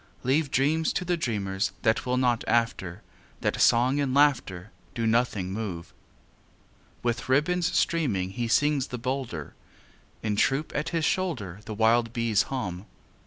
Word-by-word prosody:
Leave 140 +3 +1
dreams 155 +4 +1
to 180 - -2
the 175 0 +1
dreamers 105 - -2
That 110 +2 +1
will 125 0 +1
not 125 -2 +1
after, 115 -7 0 0.4
That - - 0
song 125 +4 +4
and 135 -2 0
laughter 110 -10 +2 0.2
Do 115 - -1
nothing 110 -5 +1
move. 95 -6 -5 1.1
With 120 +1 -2
ribbons 175 +6 +2
streaming 105 - 0
He 120 +4 -3
sings 145 +3 +2
the 125 - -5
bolder; 125 - -4 0.7
In 105 -2 0
troop 140 +7 +1
at 150 - -2
his 165 -2 0
shoulder 120 - -2
The 110 - -6
wild 115 +1 +3
bees 115 -4 +2
hum. 95 -8 -4
120 Hz, 145 wpm, -27 LUFS, 105-140 Hz, 1.1 s, song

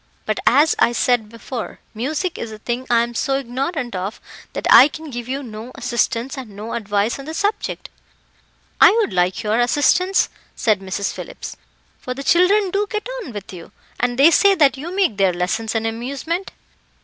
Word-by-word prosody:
But, - - -1
as 300 +2 +5
I 240 - +4
said 240 -2 +1
before, 230 +1 -7
music 305 - -3
is 230 - -5
a 215 - -8
thing 240 +4 -4
I 235 -1 +4
am 240 0 -5
so 270 +3 0
ignorant 270 - -3
of 190 +4 -4 0.3
that - - -4
I 270 - +10
can 310 0 -9
give 240 -1 -6
you 275 +2 -3
no 225 0 -8
assistance 245 +2 -1
and 220 -6 -10
no 215 +3 -6
advice 210 +1 -1
on 275 - -8
the 315 +1 -6
subject." 410 +5 -2 0.9
"I - - +9
would 445 - +1
like 180 +3 +1
your 215 +2 +1
assistance," 295 +10 +3 0.3
said 215 -4 +2
Mrs. 195 +1 -3
Phillips, - - -8 0.4
"for 250 - -5
the 275 - -6
children 370 +5 +3
do 410 +2 0
get 425 +2 -3
on 290 - -8
with 205 -3 -8
you, 170 -2 -10 0.3
and 245 -1 0
they 290 +5 +7
say 395 +3 +5
that 290 -6 +4
you 300 +6 -7
make 375 - +1
their 190 -2 +3
lessons 210 +6 -2
an 225 0 0
amusement." 275 +11 -3
245 Hz, 185 wpm, -20 LUFS, 220-310 Hz, 0.9 s, I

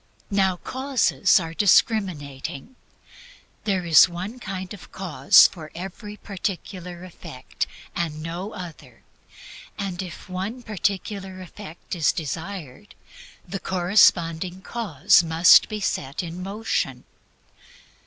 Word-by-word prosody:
Now 190 -2 +2
causes 260 -3 +2
are 165 -2 -5
discriminating. 180 - +1 0.9
There 190 -4 0
is 165 +1 +7
one 190 +8 -6
kind 190 -4 -6
of 200 - -13
cause 150 -8 +5
for 155 -4 -2
every 200 +4 -8
particular 180 -3 -5
effect 170 -7 -6 0.3
and 155 -3 -3
no 175 +5 -5
other, 155 - -10 0.7
and 195 -2 -3
if 180 0 -9
one 195 +7 -5
particular 195 -2 -3
effect 185 -1 -10
is 165 -4 +2
desired, 165 +1 -6 0.5
the 195 - -4
corresponding 180 -1 +2
cause 195 - +3
must 165 +1 +6
be 215 - -4
set 140 -6 -2
in 170 +1 -6
motion. 205 +4 -2
185 Hz, 105 wpm, -24 LUFS, 165-200 Hz, 0.9 s, is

